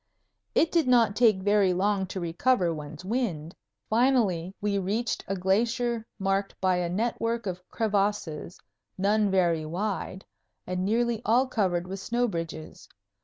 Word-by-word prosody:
It 325 - +3
did 330 -5 +2
not 230 -5 +4
take 215 -5 +4
very 205 -2 +3
long 190 +1 +1
to 190 - -5
recover 175 +2 +1
one's 155 +2 -8
wind. 185 -9 -2 0.3
Finally 220 -8 +2
we 205 -1 0
reached 210 +5 -2
a 195 - -1
glacier 225 +5 0
marked 195 0 -1
by 185 -1 +2
a 175 -1 -1
network 230 +3 -1
of 180 -2 -4
crevasses, 200 -6 -1 0.4
none 205 +2 +2
very 175 -4 +2
wide, 190 +3 -4 0.4
and 185 0 -2
nearly 230 +2 +1
all 240 +4 +3
covered 185 -8 0
with 190 +2 -6
snow 240 +5 0
bridges. 165 -5 -6
200 Hz, 140 wpm, -27 LUFS, 180-230 Hz, 0.4 s, not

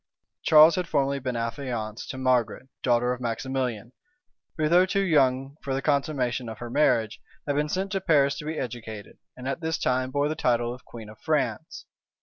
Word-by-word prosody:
Charles 155 +2 +7
had 180 -1 -1
formerly 140 -2 0
been 125 -2 -3
affianced 115 -2 -4
to 130 - -5
Margaret, 130 -1 0
daughter 125 0 +2
of 125 - -8
Maximilian; 120 -1 -3 0.7
who, 155 -1 +1
though 175 +3 +5
too 195 +1 +1
young 135 -4 +2
for 135 -1 -2
the 135 - -1
consummation 135 -5 0
of 110 - -7
her 120 +1 -7
marriage, 115 -6 +2 0.2
had 145 - -1
been 150 +1 0
sent 190 +4 -2
to 195 -2 -1
Paris 140 -3 +3
to 150 - -7
be 155 +1 -4
educated, 110 -3 -7 0.2
and 125 +1 -7
at 135 +4 -3
this 160 0 -1
time 130 0 0
bore 145 +2 0
the 155 - -1
title 120 -6 0
of 125 - -13
queen 115 -3 -10
of 110 0 -13
France. 155 0 -2
130 Hz, 190 wpm, -26 LUFS, 120-150 Hz, 0.7 s, Charles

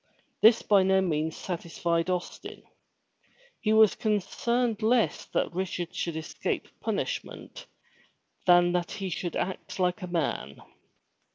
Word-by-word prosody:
This 225 +1 +6
by 200 -2 +5
no 190 0 +3
means 160 -3 -1
satisfied 170 -1 -2
Austin. 180 -1 -4 1.0
His 220 -1 +5
concern 235 +3 0
was 220 - -8
less 230 +1 +2
that - - -1
Rich 185 0 -3
ard 175 +1 -4
should 170 -2 -3
escape 160 - -3
punishment, - - -4 0.8
than 175 0 +6
that 175 -1 -1
he 195 -3 -4
should 175 +1 -3
act 190 - -4
like 180 +1 0
a 180 - -4
man. 145 - -3
185 Hz, 125 wpm, -28 LUFS, 170-215 Hz, 1.0 s, This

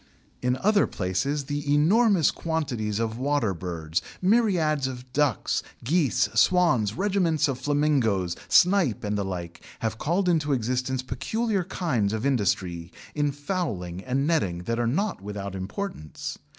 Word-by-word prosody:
In 125 +1 +1
other 205 +7 +3
places 135 +11 -1
the 145 +1 -3
enormous 185 - +4
quantities 130 -11 -2
of 115 0 -2
water 135 -7 +1
birds, 85 -2 -3 0.2
myriads 180 - +2
of 125 0 -8
ducks, 145 -6 +1 0.2
geese, 145 - +2
swans, 125 - +3
regiments 185 -5 +1
of 135 -3 -3
flamingoes, 130 - +1
snipe, 180 - +4
and 105 0 -1
the 100 - 0
like, 90 -3 -6 0.2
have 110 -1 -2
called 180 +5 0
into 155 -4 +2
existence 125 +1 -1
peculiar 200 - -1
kinds 130 - -1
of 110 +3 -2
industry 95 -9 0 0.2
in 145 -1 +1
fowling 135 - -3
and 135 +2 0
netting 95 - 0
that 115 +5 -2
are 120 - +1
not 190 - -1
without 100 -1 -5
importance. 95 - -5
130 Hz, 135 wpm, -26 LUFS, 105-165 Hz, 0.2 s, enormous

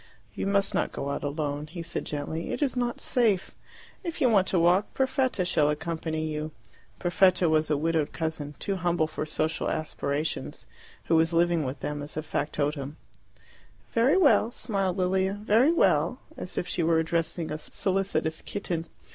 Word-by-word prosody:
"You - - -3
must 200 0 +2
not - - 0
go 140 - -3
out 140 - -3
alone," 145 0 -2
he 170 +2 -7
said - - -3
gently. 150 +3 -4
"It - - -1
is 270 - 0
not 245 -1 -1
safe. 220 -7 +1 0.5
If 340 -3 -4
you 255 -5 +4
want 195 -3 +4
to 185 - +1
walk, 175 +4 +3
Perfetta 260 -6 +1
shall 150 -4 +2
accompany 160 +1 -2
you." 155 0 -3 0.5
Perfetta 180 0 +3
was 155 0 +2
a 150 - +2
widowed 160 0 0
cousin, 160 -3 -3
too 195 -1 -2
humble 175 -2 +1
for 155 0 -4
social 155 +1 0
aspirations, 155 -1 -3 0.4
who 165 - +2
was 165 +1 +3
living 170 -1 +3
with 130 0 -5
them 150 0 -3
as 145 +1 -7
factotum. 145 -1 -2 1.0
"Very 255 +9 +4
well," 235 - +5
smiled 195 -6 -1
Lilia, 190 +1 +1
"very 215 +7 +3
well" 180 - +3 0.2
as 180 - -6
if 180 - -1
she 175 - -1
were 165 0 +3
addressing 165 0 -1
a 155 - -3
solicitous 185 -2 -1
kitten. 170 -5 -4
170 Hz, 165 wpm, -27 LUFS, 155-195 Hz, 1.0 s, well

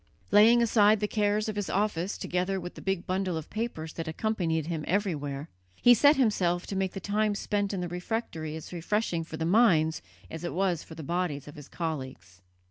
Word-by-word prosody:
Laying 225 +4 +7
aside 215 -2 +4
the 210 - 0
cares 210 0 +1
of 215 - -3
his 205 -2 -3
office 200 -2 -1
together 180 +2 -1
with 175 0 -7
the - - -11
big 195 -2 -2
bundle 185 -2 -1
of 160 - -7
papers 215 -8 -4
that 165 0 -5
accompanied 165 -3 -1
him 160 -2 -3
everywhere, 155 -7 -1 0.3
he 245 - +6
set 285 +6 +6
himself 185 -9 +1
to 195 - -5
make 190 -1 -1
the 195 - -5
time 210 +1 0
spent 205 0 -1
in 195 -3 -3
the 175 - -2
refectory 175 -3 -4
as 160 +2 -8
refreshing 175 0 -1
for 160 0 -8
the 160 - -2
minds 170 -5 +4 0.3
as 165 +1 -6
it 175 - -4
was 180 -3 +1
for 160 - -11
the 160 - -8
bodies 170 -3 -2
of 145 - -9
his 145 -3 -12
colleagues. 130 - -5
180 Hz, 205 wpm, -28 LUFS, 160-210 Hz, 0.3 s, Laying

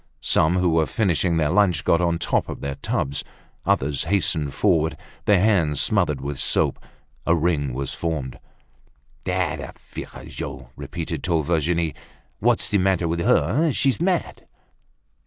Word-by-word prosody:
Some, 80 +3 +3
who 90 -1 +2
were 80 -1 +2
finishing 90 -4 +1
their 75 -2 +2
lunch, 90 -5 +3
got 85 - +3
on 85 -1 +2
the - - -2
tops - - 0
of - - -6
their 70 0 -3
tubs. 70 +1 -2 0.4
Others 70 +1 +1
hastened 80 -5 +1
forward, 80 -6 +2 0.3
their 100 -3 +5
hands 90 -8 +2
smothered - - +1
with 70 0 -4
soap. - - +1 0.4
A 85 - +5
ring 80 -4 0
was 70 +2 -3
formed. 75 -6 -3 0.9
"Ah! - - 0
the - - -7 0.2
virago!" 65 -2 -7
repeated 80 +2 -5
tall 85 -3 +1
Virginie. 85 0 0 0.5
"What's - - +2
the 100 - +3
matter 95 -2 +2
with 85 +1 -1
her? 125 - +3
She's 135 +3 +1
mad!" 180 -1 -1
85 Hz, 150 wpm, -23 LUFS, 75-90 Hz, 0.9 s, their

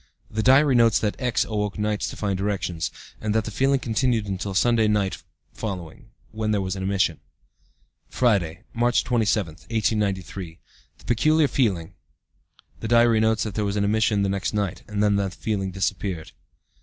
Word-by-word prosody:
(The 110 - -1
diary 135 +4 +5
notes 115 -2 +5
that 105 -1 -1
X. 125 -3 +1
awoke 105 -2 -2
nights 105 0 -1
to - - -8
find 100 -2 -2
erections, 95 -5 -2 0.3
and 105 0 -1
that 110 -1 +1
the 110 - -5
feeling 135 +5 +2
continued 115 -2 0
until 95 0 -4
Sunday 115 +1 +3
night 105 -3 0 0.3
following, 100 - -6 0.2
when 110 0 -2
there 105 -1 +2
was 95 0 -3
an 95 - -5
emission.) 95 -4 0 0.9
"Friday, 95 -9 +1
March 120 +1 +2
27, 110 -7 +1 0.2
1893. 100 -6 -1 0.4
The - - -20
peculiar 155 +6 +3
feeling. 95 -13 0 0.9
(The 115 - -4
diary 115 -1 +4
notes 110 0 +2
that 110 - -4
there 105 - -1
was 100 0 -1
an 105 - +1
emission 105 0 +2
the 100 - +1
next 100 +2 -2
night, 100 -3 -2
and 105 -1 -1
that 105 -1 +3
the 100 -1 0
feeling 95 0 -3
disappeared.) 95 -2 -3
105 Hz, 170 wpm, -24 LUFS, 95-115 Hz, 0.9 s, diary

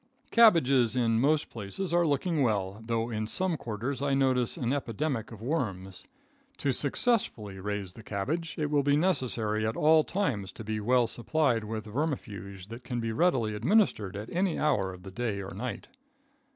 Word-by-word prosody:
Cabbages 140 - +5
in 115 -2 +2
most 150 +2 +2
places 115 - -4
are 175 -1 +3
looking 150 +2 +1
well, 105 -4 0
though 115 +1 -1
in 110 -1 -2
some 185 +8 0
quarters 120 +2 -4
I 140 -1 +1
notice 130 -3 +1
an 125 +1 0
epidemic 135 -2 -2
of 110 -1 -10
worms. 100 - -3 0.5
To 140 - 0
successfully 130 - 0
raise 100 -1 -4
the 115 - -11
cabbage, 135 - -3
it 150 -1 -1
will 145 -1 +3
be 145 +1 +3
necessary 120 - +1
at 110 +1 -1
all 155 +1 +5
times 120 - -2
to - - -8
be 110 0 -3
well 120 +3 +3
supplied 120 -1 0
with 110 0 -4
vermifuge 105 - -4
that 115 +2 -9
can 120 -1 -3
be 115 -1 -2
readily 120 -6 +2
administered 110 - +2
at 105 +3 -6
any 180 0 0
hour 125 -11 +1
of 90 -1 -12
the 95 - -9
day 110 -1 -2
or 95 -2 -6
night. 125 +6 -5
120 Hz, 175 wpm, -29 LUFS, 105-150 Hz, 0.5 s, Cabbages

